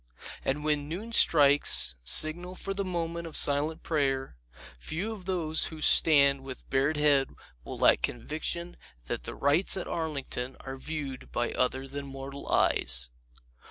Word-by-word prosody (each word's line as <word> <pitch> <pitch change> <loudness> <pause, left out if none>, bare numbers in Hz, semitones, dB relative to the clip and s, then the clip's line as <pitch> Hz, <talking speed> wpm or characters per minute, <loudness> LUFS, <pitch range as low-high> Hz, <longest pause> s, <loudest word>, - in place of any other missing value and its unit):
And 145 +2 -2
when 150 -1 -1
noon 210 +8 -6
strikes, 145 - +4
signal 165 - +3
for 195 +1 -4
the 200 0 -3
moment 170 -2 -4
of 160 - -2
silent 145 +3 +3
prayer, 135 - -1 0.4
few 175 - -4
of 205 -5 -9
those 165 -4 +1
who 160 - -8
stand 140 -3 +4
with 130 -1 -10
bared 135 +3 +1
head 145 -2 +2 0.3
will - - -8
lack - - +4
conviction 160 +7 -3 0.3
that - - -5
the - - -6
rites 150 +8 +2
at 185 - -4
Arlington 140 -5 -4
are 135 0 -7
viewed 140 -1 -7
by 120 0 -2
other 130 +1 -1
than 140 +1 -7
mortal 135 +1 -9
eyes. 60 -1 +2
150 Hz, 150 wpm, -28 LUFS, 135-165 Hz, 0.4 s, strikes